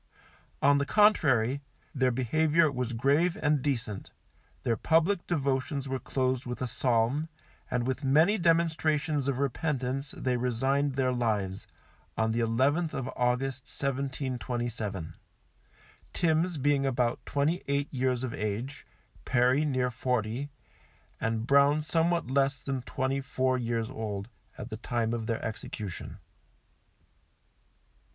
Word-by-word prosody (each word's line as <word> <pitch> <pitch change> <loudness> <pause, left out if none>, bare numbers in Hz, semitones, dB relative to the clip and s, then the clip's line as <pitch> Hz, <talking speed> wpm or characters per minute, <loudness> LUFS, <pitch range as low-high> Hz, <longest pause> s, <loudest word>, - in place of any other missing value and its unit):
On 140 +1 +5
the 140 - 0
contrary, 140 - +4 0.3
their 130 -2 +2
behaviour 155 +6 +2
was 125 -2 -2
grave 140 +9 +2
and 150 -2 +2
decent, 115 -8 -3 0.5
their 115 - +1
public 165 - +2
devotions 140 -3 -1
were 130 0 -2
closed 130 +1 -1
with 125 - -4
a 130 - -1
Psalm, 125 +6 +1 0.4
and 125 -1 0
with 130 +3 -2
many 160 +10 +4
demonstrations 160 -3 +1
of 135 -2 0
repentance 135 -1 -2
they 125 -1 0
resigned 135 +3 0
their 130 -1 +2
lives, 105 -5 -1 0.5
on 110 0 +2
the 115 - 0
11th 135 +9 +1
of 130 -1 -3
August, 125 +2 0
1727; 120 - -3 1.0
Timms 165 +1 +1
being 140 0 +2
about 125 -3 0
twenty 150 +5 0
eight 140 +1 0
years 130 -1 0
of 125 - -3
age, 110 +6 -4 0.4
Perry 130 +3 +3
near 130 -3 0
forty, 125 +2 -1 0.7
and 115 0 -1
Brown 140 +3 +4
somewhat 170 +2 +1
less 135 +2 +1
than 135 -2 -2
twenty 130 +2 -2
four 130 -1 0
years 115 -2 -1
old, 105 -4 -4 0.3
at - - -7
the - - -4
time 115 -2 -1
of 115 -2 -3
their 115 -2 -2
execution. 105 -3 -6
130 Hz, 125 wpm, -29 LUFS, 120-145 Hz, 1.0 s, On